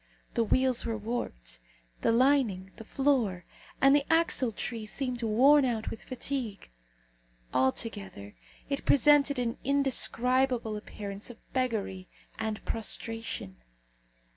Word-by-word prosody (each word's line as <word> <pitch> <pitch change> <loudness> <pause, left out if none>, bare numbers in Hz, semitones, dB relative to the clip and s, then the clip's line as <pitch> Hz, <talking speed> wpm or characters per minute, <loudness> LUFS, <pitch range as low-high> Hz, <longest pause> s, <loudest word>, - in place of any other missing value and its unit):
The 230 - +2
wheels 255 +2 +2
were 225 -1 -2
warped. - - -5 0.4
The - - +3
lining, 230 -7 +2
the - - -9
floor, 230 -9 0 0.3
and 275 +1 +6
the 290 - +3
axletrees 245 -8 +1
seemed 250 -2 -2
worn 260 +7 +5
out 230 -4 -1
with 225 - -7
fatigue. 250 - -4 0.8
Altogether, 130 - -2 0.3
it 280 0 -3
presented 285 0 +4
an 235 -2 -2
indescribable 255 -3 +2
appearance 205 0 -7
of 240 - -10 0.2
beggary 215 -8 -2 0.3
and 220 -1 -3
prostration. 225 - -4
230 Hz, 110 wpm, -29 LUFS, 210-265 Hz, 0.8 s, and